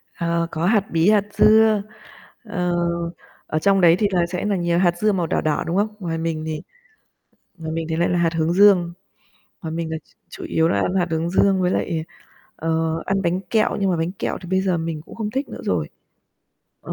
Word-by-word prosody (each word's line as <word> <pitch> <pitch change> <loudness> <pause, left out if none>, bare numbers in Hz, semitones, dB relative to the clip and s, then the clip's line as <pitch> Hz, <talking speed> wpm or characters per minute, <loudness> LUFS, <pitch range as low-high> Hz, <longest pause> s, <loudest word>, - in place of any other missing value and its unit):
Ờ, 170 0 -1
có 165 +2 -2
hạt 210 0 +3
bí, 165 +4 +3
hạt 210 -2 +4
dưa, 215 -1 +5 0.6
ờ, 180 -5 -2 0.7
ở 155 - -1
trong 195 +1 +3
đấy 170 -1 +6
thì 210 - +3
là 175 -2 +2
sẽ 180 +3 -4
là 205 -1 +1
nhiều 175 -1 0
hạt 175 -2 +2
dưa 215 +2 +2
màu 175 -4 -1
đỏ - - 0
đỏ, 155 -1 0
đúng 175 +3 -1
không? 210 +1 0
Ngoài 165 -3 -3
mình 160 -1 -3
thì 155 -1 -4 1.0
ngoài 160 -1 -5
mình 165 0 -3
thì 160 - -1
lại 170 - +1
là 175 - +1
hạt 165 -1 +1
hướng 165 +1 +1
dương, 185 -3 +5 0.7
ngoài 160 -2 -5
mình 165 0 -3
là 160 - -2
ch - - -30 0.2
chủ - - -9
yếu 160 0 +1
là 100 - +1
ăn 185 - -1
hạt 180 -2 +1
hướng 165 +1 -1
dương 190 0 +3
với 180 0 +1
lại, 165 -2 -1 0.5
ờ, 165 0 -1
ăn 195 0 0
bánh 180 +1 0
kẹo, 220 -2 +2
nhưng 195 -1 +1
mà 175 - +1
bánh 165 +2 -1
kẹo 200 - -3
thì 180 - -9
bây 190 0 +2
giờ 185 -3 0
mình 165 -2 -4
cũng - - -12
không 215 -2 -3
thích 270 +3 -3
nữa - - -8
rồi. 80 -5 -1 0.9
Ờ, - - -6
175 Hz, 225 wpm, -21 LUFS, 165-195 Hz, 1.0 s, đấy